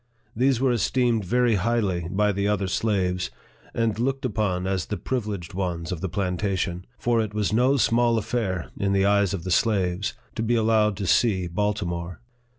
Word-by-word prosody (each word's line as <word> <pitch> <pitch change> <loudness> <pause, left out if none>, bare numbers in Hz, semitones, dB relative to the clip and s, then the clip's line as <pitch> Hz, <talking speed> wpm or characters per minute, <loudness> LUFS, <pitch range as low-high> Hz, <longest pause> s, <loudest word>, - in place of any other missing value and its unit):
These 130 +1 +2
were 130 -1 +2
esteemed 120 -1 +1
very 120 +4 +2
highly 100 -4 0
by 105 +2 +2
the 100 +1 -1
other 105 -1 +1
slaves, 90 -2 0 0.4
and 115 -2 -1
looked 135 +2 -1
upon 100 -6 -1
as 95 -3 -1
the 105 - -3
privileged 105 -8 -4
ones 90 -3 -3
of 85 -3 -4
the 95 - -2
plantation; 90 -1 -2
for 120 -1 +1
it 105 -1 -4
was 105 -1 0
no 130 +5 +3
small 120 -1 +3
affair, 100 -5 -2
in 100 -1 0
the 95 0 +3
eyes 100 -2 +3
of 85 - -6
the 90 - -4
slaves, 95 -1 +1 0.2
to - - -3
be 115 +2 +1
allowed 110 -2 +2
to 100 - -3
see 95 -2 +2
Baltimore. 90 -2 -2
100 Hz, 175 wpm, -25 LUFS, 90-115 Hz, 0.4 s, no